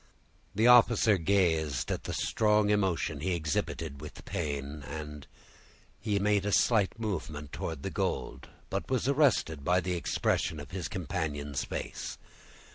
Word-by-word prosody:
The 110 +3 +3
officer 115 -4 +6
gazed 80 -7 +1
at - - -3
the - - -3
strong 105 -1 +2
emotion 95 -7 +1
he 90 +4 0
exhibited 80 -2 -2
with 75 - -10
pain, 75 -2 -3
and 75 0 -7 0.7
he 100 -1 0
made 100 0 +2
a 105 - -1
slight 110 0 +3
movement 80 -9 -4
towards 80 -4 -4
the - - -3
gold; - - -3 0.2
but 95 - -2
it - - -21
was 130 -1 0
arrested 130 - +2
by 90 +4 +3
the 90 +1 -2
expression 80 -2 0
of 75 - -9
his 90 -3 -3
companion's 75 -5 -3
face. - - -5
90 Hz, 145 wpm, -30 LUFS, 75-105 Hz, 0.7 s, officer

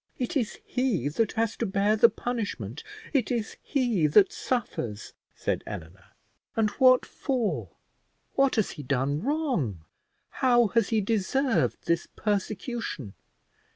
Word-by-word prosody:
"It 250 +2 -3
is 245 -7 0
he 240 - 0
that 215 +8 0
has 225 0 0
to 230 - -1
bear 200 +2 +2
the 225 +2 +7
punishment; 200 - -4 0.3
it 265 -6 +2
is 230 -3 -2
he 240 - +1
that 190 +6 +5
suffers," 120 - -3 0.2
said - - -2
Eleanor; 85 +4 -8 0.5
"and 215 -2 +2
what 255 -1 +7
for? 250 -6 -2 0.6
what 275 -1 +3
has 220 -4 +1
he 150 - -8
done 140 +2 0
wrong? 245 - -1 0.6
how 240 -4 +5
has 230 -2 +2
he 220 -2 +2
deserved 225 +5 0
this 170 0 +1
persecution? 205 - -3
215 Hz, 130 wpm, -27 LUFS, 155-245 Hz, 0.6 s, the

